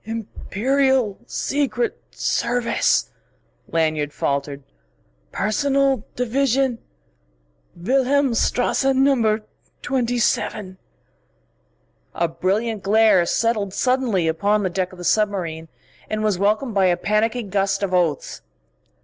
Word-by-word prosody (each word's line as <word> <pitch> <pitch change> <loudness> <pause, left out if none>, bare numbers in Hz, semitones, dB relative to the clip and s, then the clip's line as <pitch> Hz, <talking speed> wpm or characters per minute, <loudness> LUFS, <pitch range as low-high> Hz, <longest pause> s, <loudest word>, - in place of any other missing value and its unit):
"Imperial 230 +2 -1
Secret 255 -5 -1
Service," 240 0 0 0.6
Lanyard 155 -3 0
faltered 140 0 -2 0.7
"Personal 275 +2 +1
Division 255 0 0 1.0
Wilhelmstrasse 265 +3 +1
Number 235 -6 +2 0.4
27 235 -7 -1 0.7
" - - -42
A 170 - +1
brilliant 195 +6 -1
glare 205 -3 +4
settled 215 -3 0
suddenly 250 -9 +1
upon 205 +6 +1
the 185 - -1
deck 185 0 -2
of 185 - -13
the 175 - -8
submarine, 175 -6 0 0.4
and 215 0 -2
was 210 -4 0
welcomed 215 +5 +1
by 195 -2 +3
a 175 -1 +2
panicky 215 +5 0
gust 195 -1 -1
of 190 -2 -2
oaths. 170 -6 0
215 Hz, 100 wpm, -21 LUFS, 185-245 Hz, 1.0 s, glare